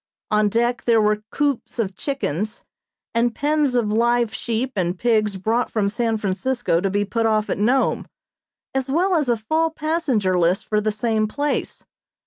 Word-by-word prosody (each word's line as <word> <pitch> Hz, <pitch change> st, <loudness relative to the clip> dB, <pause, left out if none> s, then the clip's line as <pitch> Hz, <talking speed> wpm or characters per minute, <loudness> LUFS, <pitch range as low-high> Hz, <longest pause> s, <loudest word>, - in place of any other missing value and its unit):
On 210 Hz, 0 st, +3 dB
deck 240 Hz, +4 st, 0 dB
there 230 Hz, -2 st, +4 dB
were 210 Hz, 0 st, +2 dB
coops 275 Hz, -5 st, -1 dB
of 195 Hz, -5 st, -2 dB
chickens, 215 Hz, -, -3 dB, 0.5 s
and 235 Hz, 0 st, +1 dB
pens 295 Hz, -2 st, +1 dB
of 225 Hz, -4 st, +1 dB
live 235 Hz, 0 st, +2 dB
sheep 235 Hz, +3 st, -2 dB
and 180 Hz, -2 st, -1 dB
pigs 215 Hz, -3 st, +1 dB
brought 225 Hz, +5 st, 0 dB
from 205 Hz, -3 st, 0 dB
San 225 Hz, +1 st, 0 dB
Francisco 210 Hz, -2 st, 0 dB
to 195 Hz, -, 0 dB
be 205 Hz, +1 st, 0 dB
put 225 Hz, +2 st, 0 dB
off 215 Hz, -1 st, +1 dB
at -, -, -2 dB
Nome, 250 Hz, +6 st, +1 dB, 0.7 s
as 265 Hz, 0 st, -1 dB
well 360 Hz, +7 st, +2 dB
as 300 Hz, -7 st, +1 dB
a 235 Hz, -, +2 dB
full 315 Hz, +9 st, 0 dB
passenger 295 Hz, -, 0 dB
list 175 Hz, +2 st, +1 dB
for 210 Hz, -1 st, 0 dB
the 215 Hz, +1 st, 0 dB
same 215 Hz, 0 st, 0 dB
place. 290 Hz, +6 st, -2 dB
230 Hz, 170 wpm, -22 LUFS, 210-260 Hz, 0.7 s, there